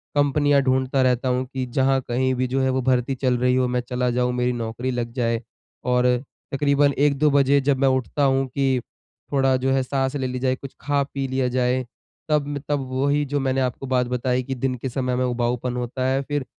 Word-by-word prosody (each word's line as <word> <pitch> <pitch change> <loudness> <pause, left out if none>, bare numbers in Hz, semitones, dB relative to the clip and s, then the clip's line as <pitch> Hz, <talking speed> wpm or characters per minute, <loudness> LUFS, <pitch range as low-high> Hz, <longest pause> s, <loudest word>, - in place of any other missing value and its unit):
कंपनियाँ 145 0 +3
ढूँढता 130 0 +1
रहता 130 0 +2
हूँ 125 +1 0
कि 130 -1 -2
जहाँ 135 +2 +1
कहीं 130 +2 +1
भी 130 +1 0
जो 135 +2 0
है 130 - +2
वो 130 0 0
भर्ती 130 +1 +1
चल 125 -1 +1
रही 125 +1 +2
हो 130 -1 +2
मैं 125 0 0
चला 125 0 0
जाऊँ, 125 0 0
मेरी 125 0 0
नौकरी 120 +2 -3
लग 120 -1 -3
जाए। 115 -2 0 0.4
और 125 0 +2 0.5
तकरीबन 140 0 +3
1-2 145 +1 +3
बजे 140 0 +4
जब 135 0 +1
मैं 135 - +3
उठता 130 +2 0
हूँ 135 0 +3
कि 130 -1 0 0.5
थोड़ा 135 -1 +3
जो 130 +1 0
है, 135 0 +2
साँस 135 +1 -1
ले 130 -2 -1
ली 125 0 -4
जाए, 130 0 +1
कुछ 135 +1 -10
खा, 145 0 +1
पी 135 -1 -4
लिया 130 0 0
जाए, 125 0 +1 0.5
तब 145 -1 0
तब 145 -1 +1
वही 140 +3 +1
जो 145 +1 -1
मैंने 135 -1 0
आपको 130 +1 -2
बात 125 -1 +1
बताई 125 +1 0
कि 135 +1 -4
दिन 130 0 -1
के 130 +2 -5
समय 125 0 -1
में 130 - +1
उबाऊपन 125 0 -1
होता 125 +1 -3
है, 135 +1 +1
फिर 145 -1 -3
130 Hz, 215 wpm, -23 LUFS, 125-135 Hz, 0.5 s, बजे